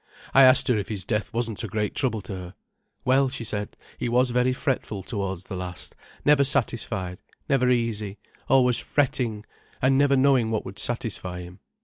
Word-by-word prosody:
I 135 - +7
asked 130 -1 +6
her 125 - +3
if 100 - -4
his 100 -5 -5
death 105 -1 -1
wasn't 115 -2 -2
a - - -2
great 105 +1 -2
trouble 120 -6 -1
to 95 - -7
her. 90 0 -8 0.5
'Well,' 135 +1 +4
she 125 -2 -5
said, 105 -2 -5 0.2
'he - - -1
was 125 +1 +3
very 125 +1 +2
fretful 125 -7 -2
towards 95 -3 -4
the 95 - -7
last, 90 -1 -6 0.3
never 145 -1 +5
satisfied, 115 -9 -1 0.3
never 125 -2 +3
easy, 110 -4 0 0.3
always 125 -2 +5
fret 145 -3 +1
fretting, 110 -4 -3 0.3
an' 135 +1 +3
never 140 -1 +4
knowing 130 -4 +4
what 110 -2 -2
would 95 +2 -7
satisfy 95 -7 -2
him. 90 +2 -11
115 Hz, 185 wpm, -25 LUFS, 100-130 Hz, 0.5 s, I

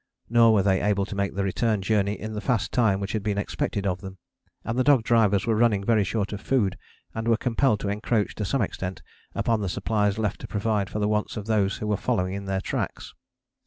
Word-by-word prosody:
Nor 115 -1 +6
were 100 - +3
they 95 -1 +2
able 100 -1 +1
to 105 - -7
make 100 -1 -1
the 100 - 0
return 105 +3 0
journey 105 0 +1
in 110 0 -5
the 105 - -4
fast 120 -6 0
time 110 -6 +2
which 100 -1 -3
had 110 - -1
been 105 -1 -1
expected 100 0 -2
of 90 -1 -1
them, 95 -1 -9 0.5
and 115 - -3
the - - +4
dog 135 -4 +4
drivers 110 -4 +3
were 115 - +2
running 105 -3 +2
very 110 0 +3
short 105 +1 -2
of 105 - -5
food 110 -9 +1 0.4
and 110 +1 -4
were 115 -1 +4
compelled 125 -2 +1
to 100 - -2
encroach 105 +1 0
to 105 - -4
some 115 +5 0
extent 95 -2 -5 0.3
upon 115 -2 +1
the 100 - -2
supplies 105 +1 0
left 105 -3 -2
to - - -6
provide 105 -2 -1
for - - -5
the 105 0 +1
wants 105 +1 -1
of 105 - -5
those 105 -3 +1
who - - -5
were 105 -1 0
following 90 +1 -1
in 100 0 -5
their 95 0 -1
tracks. - - -4
105 Hz, 235 wpm, -25 LUFS, 100-110 Hz, 0.5 s, Nor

